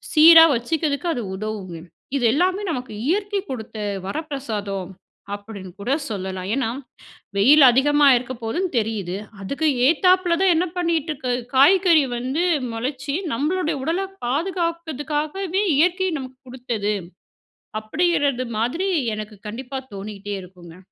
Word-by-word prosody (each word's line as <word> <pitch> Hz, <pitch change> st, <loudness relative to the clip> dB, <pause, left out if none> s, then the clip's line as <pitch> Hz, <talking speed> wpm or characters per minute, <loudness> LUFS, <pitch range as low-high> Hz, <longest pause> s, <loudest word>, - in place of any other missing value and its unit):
சீரா 325 Hz, +1 st, +9 dB
வச்சுக்கிறதுக்கு 290 Hz, +6 st, -1 dB
அது 245 Hz, -, -3 dB
உதவுங்க. 195 Hz, -4 st, -5 dB, 0.4 s
இது 250 Hz, -, -1 dB
எல்லாமே 370 Hz, +7 st, +1 dB
நமக்கு 255 Hz, -7 st, -4 dB
இயற்கை 405 Hz, +4 st, 0 dB
கொடுத்த 225 Hz, -4 st, -6 dB, 0.3 s
வரப்பிரசாதம் 210 Hz, -, -4 dB, 0.4 s
அப்படின்னு 200 Hz, -2 st, -9 dB
கூட 245 Hz, +7 st, -1 dB, 0.2 s
சொல்லலாம். 190 Hz, -2 st, -4 dB
ஏன்னா, 265 Hz, -4 st, 0 dB, 0.7 s
வெயில் 280 Hz, +9 st, +7 dB
அதிகமா 290 Hz, +4 st, +4 dB
இருக்க 255 Hz, +1 st, -5 dB
போதுன்னு 355 Hz, +12 st, -1 dB
தெரியுது, 205 Hz, -5 st, -3 dB, 0.3 s
அதுக்கு 280 Hz, +10 st, -1 dB, 0.2 s
ஏத்தாப்பில 360 Hz, +1 st, +3 dB
தான் 375 Hz, -2 st, +5 dB
என்ன 350 Hz, +3 st, +2 dB
பண்ணிட்டு 335 Hz, -3 st, 0 dB
இருக்கு 260 Hz, -3 st, -4 dB, 0.2 s
காய்கறி 335 Hz, +2 st, +6 dB
வந்து 265 Hz, +8 st, -1 dB, 0.3 s
மொளச்சி, 270 Hz, +4 st, -3 dB, 0.2 s
நம்மளோடைய 315 Hz, +4 st, -1 dB
உடலை 345 Hz, +6 st, -1 dB, 0.2 s
பாதுகாக்குறதுக்காகவே 335 Hz, +3 st, -2 dB
இயற்கை 365 Hz, +3 st, +2 dB
நமக்கு 260 Hz, -1 st, -9 dB
குடுத்தது. 235 Hz, -5 st, -2 dB, 0.9 s
அப்படிங்கிறது 280 Hz, 0 st, 0 dB
மாதிரி 325 Hz, -, -1 dB, 0.3 s
எனக்கு 215 Hz, 0 st, -7 dB
கண்டிப்பா 260 Hz, +4 st, -6 dB, 0.2 s
தோணிக்கிட்டே 200 Hz, 0 st, -6 dB
இருக்குங்க. 175 Hz, -2 st, -14 dB
275 Hz, 115 wpm, -22 LUFS, 220-335 Hz, 0.9 s, சீரா